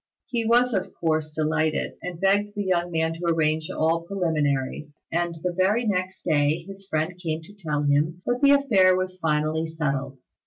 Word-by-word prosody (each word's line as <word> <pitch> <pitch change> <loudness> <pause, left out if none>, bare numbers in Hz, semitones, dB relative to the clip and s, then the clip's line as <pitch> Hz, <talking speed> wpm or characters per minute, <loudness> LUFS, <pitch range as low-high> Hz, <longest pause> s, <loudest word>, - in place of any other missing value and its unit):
He 235 -2 -2
was 245 +1 +4
of 190 -2 -2
course 155 -2 0
delighted, 155 0 0
and 180 -2 -6
begged 205 +2 +2
the 205 - -1
young 175 -2 0
man 160 -1 0
to 170 +2 -6
arrange 160 -1 +1
all 165 +1 +1
preliminaries; 150 -5 -1
and 170 0 -1
the 180 -1 -1
very 205 +6 +2
next 185 -2 -2
day 155 0 +1
his 195 +1 -11
friend 160 0 -1
came 160 -2 -3
to 205 - -14
tell 155 -7 -2
him 150 +5 +1
that 245 0 0
the 280 - +6
affair 205 -10 +4
was 185 0 -3
finally 155 0 0
settled. 140 -4 -3
165 Hz, 180 wpm, -25 LUFS, 155-190 Hz, -, the